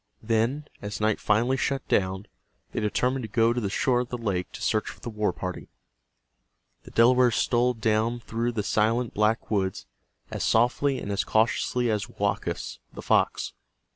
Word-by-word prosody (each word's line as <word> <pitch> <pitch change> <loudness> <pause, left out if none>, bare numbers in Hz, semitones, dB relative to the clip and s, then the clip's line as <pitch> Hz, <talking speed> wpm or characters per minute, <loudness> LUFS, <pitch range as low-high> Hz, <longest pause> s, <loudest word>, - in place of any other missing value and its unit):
Then, 115 +6 0 0.2
as 105 0 -5
night 110 0 +1
finally 120 +5 +2
shut 135 0 -1
down, 95 0 0 0.5
they - - -2
determined 125 +5 0
to 110 - -6
go 115 +1 +3
to 120 - -2
the 100 - -1
shore 125 +5 +1
of 125 -1 -3
the 125 - -3
lake 100 -6 -2
to - - -8
search 110 -1 0
for - - -10
the 120 - -6
war 105 -2 0
party. 90 +1 -6 1.2
The - - -10
Delawares 120 0 +4
stole 125 +1 +2
down 110 +2 +1
through 120 +1 -2
the 105 -3 -1
silent 115 +3 +1
black 105 +2 +1
woods 95 -3 -1 0.5
as - - -3
softly 125 +4 +2
and 100 - -5
as 100 - 0
cautiously 120 +2 +1
as 105 +2 -2
Woakus, 100 - -3
the - - -9
fox. - - +1
115 Hz, 170 wpm, -26 LUFS, 105-120 Hz, 1.2 s, Delawares